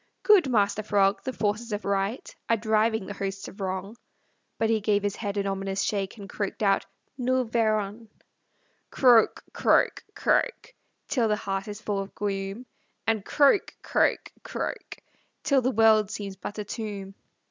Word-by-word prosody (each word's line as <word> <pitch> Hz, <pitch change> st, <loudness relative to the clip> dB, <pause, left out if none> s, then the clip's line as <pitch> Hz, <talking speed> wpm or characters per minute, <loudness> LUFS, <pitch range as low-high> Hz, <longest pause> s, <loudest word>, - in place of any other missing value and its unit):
"Good 395 Hz, -10 st, +5 dB
Master 205 Hz, -3 st, +2 dB
Frog, 200 Hz, -1 st, +2 dB
the 260 Hz, -, -2 dB
forces 220 Hz, 0 st, -2 dB
of 205 Hz, 0 st, -3 dB
right 200 Hz, +4 st, -2 dB
Are 230 Hz, -, +4 dB
driving 220 Hz, -1 st, +1 dB
the 205 Hz, -, -6 dB
hosts 195 Hz, 0 st, -4 dB
of 200 Hz, -, -11 dB
wrong." 190 Hz, +3 st, -3 dB, 0.6 s
But 225 Hz, 0 st, +1 dB
he 220 Hz, -1 st, +1 dB
gave 205 Hz, -1 st, +1 dB
his 205 Hz, -1 st, -1 dB
head 205 Hz, -2 st, -3 dB
an 200 Hz, -, 0 dB
ominous 195 Hz, 0 st, -2 dB
shake, 200 Hz, 0 st, -2 dB
And 200 Hz, -2 st, -9 dB
croaked 200 Hz, +2 st, -4 dB
out, 195 Hz, -1 st, +2 dB, 0.3 s
"Nous 255 Hz, 0 st, +1 dB
verrons!" 220 Hz, -1 st, 0 dB, 0.8 s
Croak, 245 Hz, -4 st, +4 dB
croak, -, -, +2 dB
croak, -, -, 0 dB, 0.3 s
Till 250 Hz, -5 st, +1 dB
the 210 Hz, -, +2 dB
heart 195 Hz, -1 st, -3 dB
is 205 Hz, 0 st, -7 dB
full 205 Hz, -2 st, -1 dB
of 195 Hz, 0 st, -6 dB
gloom, 195 Hz, +3 st, -3 dB, 0.4 s
And 220 Hz, -3 st, +1 dB
croak, 285 Hz, -, +3 dB
croak, -, -, +1 dB
croak, -, -, -5 dB, 0.5 s
Till 275 Hz, -2 st, +3 dB
the 255 Hz, -, +1 dB
world 220 Hz, -3 st, +4 dB
seems 200 Hz, -2 st, -5 dB
but 195 Hz, +3 st, -7 dB
a 210 Hz, -, -2 dB
tomb. 205 Hz, -2 st, -6 dB
210 Hz, 160 wpm, -27 LUFS, 195-225 Hz, 0.8 s, Good